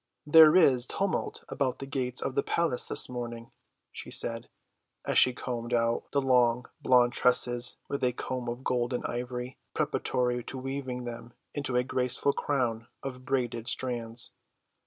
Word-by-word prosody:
"There 155 +1 +7
is 130 -8 +4
tumult 195 0 -2
about 130 -3 -2
the 135 - -7
gates 125 -2 -1
of 135 - -3
the 140 - +1
palace 165 -6 +1
this - - +4
morning," 120 -2 -7 0.4
she - - -7
said, 115 0 -2 0.6
as - - +3
she 130 - +6
combed 120 -1 -4
out 115 0 -1
the 140 -1 0
long 125 -2 +2 0.2
blonde 125 -1 +3
tresses 125 -1 +5
with 140 - -4
a 125 - +2
comb 125 0 -5
of 120 +2 -6
gold 125 0 -1
and 125 - -3
ivory, 125 +1 -5 0.2
preparatory 125 -1 -1
to 130 - -7
weaving 130 -1 -5
them 120 0 -8 0.2
into 145 -3 -3
a 125 - +2
graceful 130 +2 +1
crown 120 -6 -2 0.2
of 130 -1 -7
braided 120 -3 -2
strands. 120 -2 0
125 Hz, 155 wpm, -28 LUFS, 120-130 Hz, 0.6 s, There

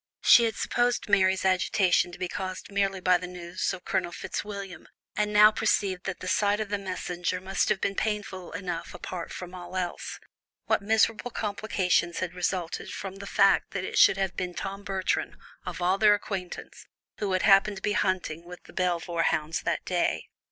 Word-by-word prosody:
She 235 - +8
had 225 -2 -1
supposed 245 0 0
Mary's 190 -1 +3
agitation 185 -1 +3
to - - -10
be 180 - -2
caused 185 +1 -5
merely 195 -1 0
by 180 -1 +4
the 180 - -6
news 180 0 -3
of 185 -1 -8
Colonel 185 -3 -1
Fitzwilliam, 200 +1 -6 0.3
and 210 0 0
now 210 +1 +8
perceived 200 -4 0
that 190 -2 -4
the 185 - -5
sight 205 +2 +2
of 215 -2 -3
the 205 0 -1
messenger 180 -2 -3
must 190 +1 0
have 195 - +2
been 195 - 0
painful 200 -4 -3
enough 175 -1 -5
apart 175 -3 -6
from 180 0 -7
all 180 0 -7
else. 180 -2 -4 0.5
What - - +2
miserable 220 +3 +2
complications 200 -6 0
had 180 -2 -3
resulted 180 -1 -2
from 195 0 -6
the 200 0 -8
fact 195 0 +3
that 195 -2 -2
it - - -1
should - - +7
have 190 -2 -1
been 180 -1 -4
Tom 195 +1 -5
Bertram, 190 -2 -1 0.3
of 175 - -4
all 185 +2 +2
their 210 -1 +6
acquaintance, 190 -3 -6 0.3
who 200 -3 -1
had 185 - +1
happened 200 0 +5
to 195 - -10
be 210 - +1
hunting 185 -5 -1
with 180 +1 -11
the - - -16
Belvoir 175 -2 0
hounds 155 0 0
that - - -2
day! 180 -1 0
190 Hz, 185 wpm, -27 LUFS, 180-200 Hz, 0.5 s, She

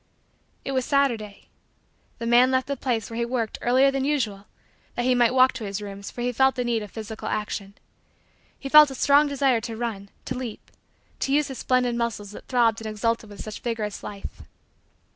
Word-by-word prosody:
It - - -2
was 260 -1 0
Saturday. 240 -8 0 0.7
The 230 - -5
man 240 +2 +5
left 260 0 +1
the 280 - -2
place 240 -5 -2
where 230 - -5
he - - +1
worked 235 -2 -2
earlier 260 +3 +4
than 270 -1 -1
usual 230 -9 -1 0.5
that 240 - -1
he 255 - +4
might 245 -1 +4
walk 255 0 +6
to 230 - -6
his 200 0 -4
rooms 200 -1 -7
for 240 - -7
he 245 +1 0
felt 265 +2 +3
the 250 - -1
need 235 -2 0
of 210 - -7
physical 220 0 -7
action. 205 -2 -3 0.8
He 275 - -7
felt 300 +1 +8
a 270 - -7
strong 285 +3 +4
desire 270 -4 +2
to 225 -1 -6
run, 215 -4 -4 0.2
to - - -3
leap, 250 -4 -7 0.5
to 270 - -1
use 290 +1 +2
his 265 - -7
splendid 250 -1 +1
muscles 220 -4 -3
that - - -11
throbbed 230 -3 +2
and 220 - -5
exulted 220 +1 -1
with 205 - -9
such 215 - -7
vigorous 220 -4 -3
life. 200 -1 -8
240 Hz, 200 wpm, -25 LUFS, 215-260 Hz, 0.8 s, felt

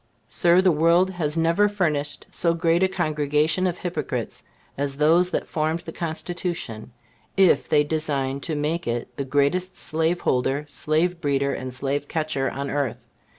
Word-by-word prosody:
Sir, 175 +7 +4
the 185 -1 +4
world 170 +4 +3
has 165 -4 -2
never 170 +6 +3
furnished 150 -8 -1
so 170 -1 +1
great 165 +1 +2
a 190 - +5
congregation 155 0 +1
of 180 -1 -2
hypocrites 180 -1 -4 0.3
as 140 0 -2
those 165 +5 +4
that - - -2
formed 160 +1 -1
the - - -8
Constitution, 165 -8 -4 0.5
if 190 -2 +4
they 150 - +4
designed 145 -3 -2
to 160 0 -3
make 155 +2 -1
it 120 +1 -3
the 140 - -1
greatest 145 +7 0
slaveholder, 150 -4 0
slave 165 +4 0
breeder 140 -2 +1
and 130 0 -5
slave 140 +3 -2
catcher 155 -4 -1
on 140 +1 -4
earth. 140 -4 -2
155 Hz, 150 wpm, -24 LUFS, 140-175 Hz, 0.5 s, a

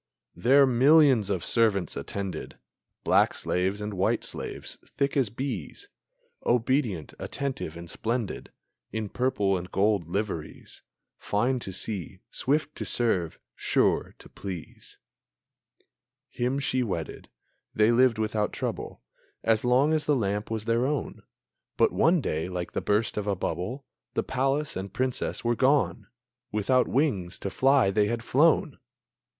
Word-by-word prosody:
There 135 +9 +5
millions 130 -3 +5
of 95 -4 -1
servants 110 -6 +2
attended, 100 -2 -5 0.5
Black - - +3
slaves 95 +3 -1
and 105 0 -4
white 95 0 +1
slaves, - - -5
thick 140 0 -2
as 135 -6 +2
bees, 135 - -5 0.5
Obedient, 120 - 0
attentive, 130 - -4
and 85 0 -9
splendid 115 +5 -3 0.4
In 110 -2 -3
purple 105 -6 +1
and 90 0 -5
gold 100 -4 +1
liveries, 95 -4 -4 0.4
Fine 125 +5 0
to 95 - -5
see, 95 -1 -3
swift 150 +3 0
to - - -3
serve, 95 -9 +1 0.2
sure - - +1
to - - -14
please! 90 -5 -9 1.3
Him 125 +2 -1
she 130 -2 0
wedded. 90 -9 -4 0.5
They 110 +2 +4
lived 120 -1 +4
without 105 -1 0
trouble - - -5 0.4
As 110 -1 +2
long 130 +5 +3
as 155 -1 +1
the 150 - +3
lamp 105 -3 -1
was 110 -1 -3
their 115 +2 +2
own; 145 -3 -3 0.6
But - - +4
one 165 0 +3
day, 80 - -2
like 90 -1 -4
the - - -2
burst 105 +1 0
of 105 -1 -2
a 100 - +1
bubble, 95 +9 -4 0.3
The - - +1
palace 135 +3 0
and 95 0 -5
Princess 130 +3 -2
were 120 0 +2
gone; 135 +3 +2 0.4
Without 115 +5 +2
wings 115 - 0
to 100 - -4
fly 135 -6 +4
they 105 +1 +2
had 115 +1 -2
flown! 150 +7 +3
115 Hz, 140 wpm, -27 LUFS, 100-130 Hz, 1.3 s, There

